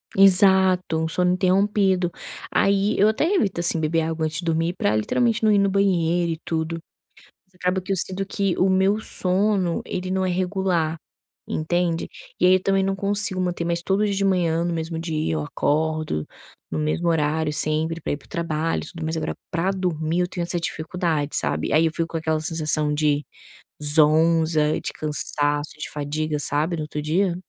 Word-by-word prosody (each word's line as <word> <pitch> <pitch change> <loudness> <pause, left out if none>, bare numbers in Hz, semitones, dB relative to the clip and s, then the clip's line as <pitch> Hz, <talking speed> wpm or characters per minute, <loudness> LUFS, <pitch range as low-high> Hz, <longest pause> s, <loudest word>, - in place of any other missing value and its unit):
Exato, 190 -3 +5
um 160 - -1
sono 180 +2 +1
interrompido, 190 -1 +1 0.4
aí 200 +1 +2
eu 205 - +5
até 220 - 0
evito 200 - 0
assim 170 -1 +2
beber 160 +1 0
água 160 0 -2
antes 155 0 -2
de 170 - -6
dormir 165 +1 0
para 105 +1 +1
literalmente 230 - 0
não 215 - +4
ir 205 - +4
no 200 0 +3
banheiro 175 -3 +1
e 160 - -9
tudo, 165 0 -2 0.7
mas 185 - -39
acaba 180 +1 -1
que 195 +2 -4
eu - - 0
sinto 190 +2 -1
que 195 -2 -1
o 190 +1 +2
meu 190 +3 +2
sono 190 -3 0
ele 185 0 -4
não 190 0 0
é 185 - 0
regular 180 -3 -1 0.6
entende. 170 +1 -1 0.3
E - - +4
aí 185 - +6
eu 185 - +1
também 195 0 +1
não 195 0 -1
consigo 200 -1 -1
manter 175 -2 -2
mais 170 0 -1
todo 195 +4 +1
dia 200 - -1
de 195 0 -1
manhã 170 -4 +1
no 175 - -1
mesmo 165 0 -4
dia, 155 - -2
eu 75 - -1
acordo 155 - -1 0.5
no - - -3
mesmo 155 +3 -1
horário 155 -1 0
sempre, 155 +2 -1
pra - - -3
ir - - -1
para 140 - -19
o - - -28
trabalho 165 -1 -2
tudo, 165 -2 -8
mas 160 +1 -2
agora 160 - -3 0.2
para 175 +3 0
dormir 175 -3 -1
eu 180 - 0
tenho 180 -1 -4
essa 175 +1 -2
dificuldade 160 -3 -2
sabe. - - -1
Aí 160 +2 +4
eu 160 - -1
fico 165 0 -2
com 165 - -5
aquela 160 -1 -1
sensação 155 -2 0
de 150 -1 +1 0.6
zonza 155 +1 +5
de - - -4
cansaço 145 -1 -1
de - - -5
fadiga 150 +1 -3
sabe 150 +4 -1
no 155 - -4
outro 150 0 -5
dia. 175 +4 0
170 Hz, 190 wpm, -23 LUFS, 155-185 Hz, 0.7 s, aí